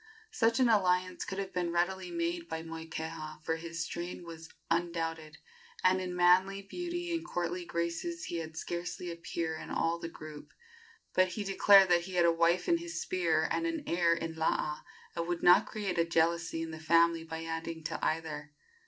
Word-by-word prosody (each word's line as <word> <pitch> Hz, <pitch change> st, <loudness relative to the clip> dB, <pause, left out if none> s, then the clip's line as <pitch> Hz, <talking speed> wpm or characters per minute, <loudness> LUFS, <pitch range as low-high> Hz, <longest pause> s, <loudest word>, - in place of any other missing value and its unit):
Such 230 Hz, -, +2 dB
an 255 Hz, -, +5 dB
alliance 185 Hz, -4 st, +2 dB
could 190 Hz, -, -5 dB
have 195 Hz, -1 st, -4 dB
been 175 Hz, -1 st, -1 dB
readily 180 Hz, +2 st, 0 dB
made 170 Hz, 0 st, -2 dB
by 160 Hz, 0 st, -4 dB
Moikeha, 160 Hz, -1 st, -6 dB
for 160 Hz, 0 st, -1 dB
his 170 Hz, 0 st, -4 dB
strain 175 Hz, +2 st, -5 dB
was 165 Hz, -1 st, -9 dB, 0.2 s
undoubted, 165 Hz, -2 st, -1 dB, 0.5 s
and 185 Hz, 0 st, +4 dB
in 180 Hz, -1 st, -4 dB
manly 185 Hz, +3 st, +4 dB
beauty 350 Hz, -, -4 dB
and 330 Hz, -1 st, -1 dB
courtly 175 Hz, -, -3 dB
graces 170 Hz, -, -3 dB
he 170 Hz, -, -3 dB
had 160 Hz, -1 st, -6 dB
scarcely 175 Hz, +1 st, -4 dB
a -, -, -5 dB
peer 170 Hz, -1 st, -3 dB
in -, -, -8 dB
all 165 Hz, +1 st, 0 dB
the 170 Hz, -, -5 dB
group; 155 Hz, -2 st, -11 dB, 0.6 s
but 185 Hz, 0 st, +4 dB
he 205 Hz, +3 st, -4 dB
declared 195 Hz, 0 st, +6 dB
that 175 Hz, -1 st, +5 dB
he 185 Hz, 0 st, -7 dB
had 175 Hz, -1 st, +4 dB
a 170 Hz, -, +6 dB
wife 170 Hz, +2 st, +2 dB
in 335 Hz, -1 st, +3 dB
his 340 Hz, -1 st, -5 dB
spear 370 Hz, -1 st, +1 dB
and 335 Hz, -, 0 dB
an 325 Hz, -2 st, -3 dB
heir 170 Hz, -1 st, +3 dB
in 165 Hz, 0 st, -4 dB
Laa, 155 Hz, -1 st, 0 dB, 0.3 s
and 170 Hz, 0 st, -2 dB
would 175 Hz, -1 st, -2 dB
not 175 Hz, -, +7 dB
create 200 Hz, -5 st, -3 dB
a -, -, +5 dB
jealousy 165 Hz, 0 st, +1 dB
in 165 Hz, -, -5 dB
the 160 Hz, -, -7 dB
family 165 Hz, +1 st, +3 dB
by 160 Hz, 0 st, -6 dB
adding 165 Hz, 0 st, -4 dB
to 165 Hz, +1 st, -4 dB
either. 155 Hz, -2 st, -2 dB
170 Hz, 190 wpm, -31 LUFS, 165-185 Hz, 0.6 s, not